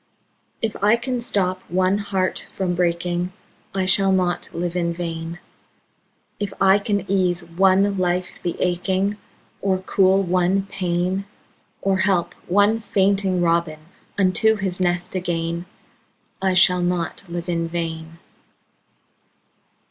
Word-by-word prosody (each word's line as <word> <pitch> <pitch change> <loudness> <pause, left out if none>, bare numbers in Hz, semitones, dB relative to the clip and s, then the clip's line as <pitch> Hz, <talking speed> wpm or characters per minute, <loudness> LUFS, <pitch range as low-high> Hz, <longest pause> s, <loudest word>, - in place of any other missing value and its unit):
If 220 -2 -1
I 210 +3 +6
can 240 +1 -3
stop 185 -5 0
one 185 +3 +2
heart 195 -2 -2
from 185 -2 -2
breaking, 175 0 -1 0.4
I 190 -1 +1
shall 195 +1 +4
not 180 -2 0
live 175 +1 -3
in 170 -1 0
vain; 165 -1 -5 1.0
If 205 -2 -3
I 195 +1 +5
can 200 -2 -1
ease 185 -2 +1
one 190 +3 +2
life 180 0 -1
the 175 - -2
aching, 190 +3 0 0.4
Or 190 -1 +1
cool 190 +1 +3
one 185 +2 +1
pain, 185 +1 -1 0.6
Or 195 -1 +1
help 190 -3 +1
one 205 +4 +3
fainting 195 -3 +1
robin 165 -2 +1 0.4
Unto 200 +3 +3
his 190 -3 -3
nest 175 0 0
again, 170 -1 -2 0.7
I 190 -1 +1
shall 180 0 +5
not 175 -1 -1
live 170 0 -5
in 170 -1 -1
vain. 165 -1 -5
185 Hz, 125 wpm, -22 LUFS, 175-195 Hz, 1.0 s, I